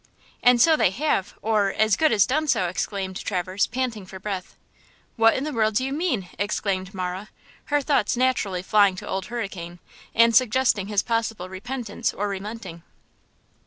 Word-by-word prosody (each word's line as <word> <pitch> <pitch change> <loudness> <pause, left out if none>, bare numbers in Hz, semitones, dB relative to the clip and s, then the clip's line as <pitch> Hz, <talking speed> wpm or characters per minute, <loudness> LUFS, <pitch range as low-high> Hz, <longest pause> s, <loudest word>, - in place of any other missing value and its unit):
"And 245 -1 +5
so 320 +6 +6
they 300 - +3
have, 230 -2 -1
or, 210 -2 +2
as 220 -1 +3
good 315 - +3
as 205 -3 +5
done 310 +4 0
so!" 185 -10 +2
exclaimed 190 +1 -3
Traverse, 185 0 -1
panting 240 -6 -3
for 190 0 -9
breath. 190 -2 -5 0.6
"What 225 -1 +5
in 260 - -1
the 305 0 -3
world 220 -2 +1
do 255 - +2
you 270 - -3
mean?" 285 - -1
exclaimed 195 -1 -2
Marah, 185 +2 -4 0.4
her 290 -1 +1
thoughts 255 -5 +1
naturally 220 -8 0
flying 200 -1 +4
to - - -8
Old 190 0 -3
Hurricane, 195 -7 -5 0.4
and 230 0 +5
suggesting 245 -4 +3
his 205 -1 +1
possible 225 -5 -2
repentance 220 +3 -4
or 205 - -1
relenting. 200 -3 -6
210 Hz, 165 wpm, -24 LUFS, 190-245 Hz, 0.6 s, so